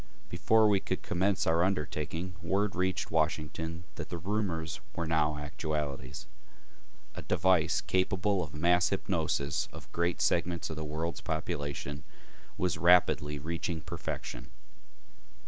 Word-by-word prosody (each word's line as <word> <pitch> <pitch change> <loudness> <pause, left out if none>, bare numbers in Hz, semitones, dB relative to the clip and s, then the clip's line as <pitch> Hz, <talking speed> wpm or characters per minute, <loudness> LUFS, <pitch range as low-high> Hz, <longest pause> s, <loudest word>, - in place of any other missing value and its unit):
Before 110 -1 +4
we 100 -2 +4
could - - -3
commence 95 +2 +1
our 80 +1 +3
undertaking, 85 0 -1
word 95 +3 0
reached 95 +1 0
Washington 80 +1 -1
that - - -5
the 85 - -3
rumors 85 -4 -2
were 85 - -1
now 75 -2 +2
actualities. 75 -3 -4 0.9
A - - -6
device 90 -3 +3
capable 95 +1 +1
of 80 - -5
the - - -7
mass 90 +2 +4
hypnosis 70 0 0
of - - -11
great 85 0 0
segments 85 -2 +1
of - - -4
the 80 - -4
world's 80 +3 -3
population 75 -3 -3 0.5
was 90 -3 0
rapidly 85 -4 +4
reaching 85 +2 -3
perfection. - - -5
85 Hz, 130 wpm, -31 LUFS, 75-90 Hz, 0.9 s, Before